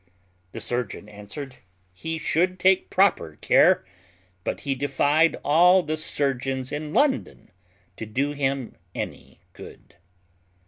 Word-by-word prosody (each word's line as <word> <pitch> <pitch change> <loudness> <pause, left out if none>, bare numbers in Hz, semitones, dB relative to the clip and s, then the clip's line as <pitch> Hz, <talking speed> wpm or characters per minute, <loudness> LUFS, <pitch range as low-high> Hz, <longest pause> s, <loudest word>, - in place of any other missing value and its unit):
The - - -7
surgeon 120 -4 -3
answered, 105 +6 -9 0.4
"He 160 - -5
should 175 +4 +1
take 190 0 +3
proper 190 - +2
care; - - +4 0.6
but - - -3
he 140 - -1
defied 145 +4 +2
all 175 +5 +5
the 155 0 -2
surgeons 135 -4 -2
in 150 +1 -4
London 280 - 0 0.5
to 110 - -6
do 135 +7 -1
him 135 -3 -2 0.2
any 65 +1 -7
good." - - -14
145 Hz, 120 wpm, -24 LUFS, 130-160 Hz, 0.6 s, all